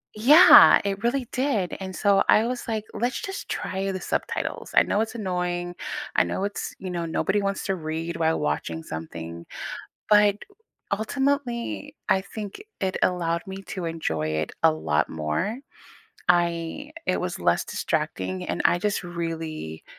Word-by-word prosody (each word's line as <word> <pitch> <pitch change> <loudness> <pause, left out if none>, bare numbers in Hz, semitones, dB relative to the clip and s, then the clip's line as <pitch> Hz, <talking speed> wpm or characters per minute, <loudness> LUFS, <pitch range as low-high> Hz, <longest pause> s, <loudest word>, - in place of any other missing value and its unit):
Yeah, 295 +11 +9
it 200 +2 -2
really 245 0 0
did. 255 -9 0
And 190 -1 -6
so 200 -1 +3
I 220 - +6
was 250 0 -4
like, 220 -2 -2
"Let's 240 +4 -1
just 390 0 -6
try 195 +1 -2
the 190 - -4
subtitles. - - -3
I - - +7
know 205 - +1
it's 225 +1 -3
annoying. 180 -3 -2 0.4
I - - +5
know 190 - -3
it's," 205 - -4
you 185 - -5
know, 175 -2 -2
"nobody 185 +5 0
wants 195 -1 -2
to 195 - 0
read 165 0 -4
while 160 0 +1
watching 80 +2 -2
something," 80 +1 -7 0.6
but, 210 -1 +5 0.6
ultimately, 270 +4 -1
I 190 - +4
think 205 - -7 0.2
it 190 -1 -1
allowed 170 -1 +1
me 190 0 -6
to 185 -3 -4
enjoy 80 - -2
it 80 0 -2
a - - +6
lot 80 -1 0
more. 80 - -2 0.7
I 175 - +1
it - - +1
was - - -3
less - - +2
distracting, 185 -1 -2
and - - -3
I 175 - +4
just 205 +1 -1
really 165 - -5
185 Hz, 155 wpm, -25 LUFS, 165-215 Hz, 0.7 s, Yeah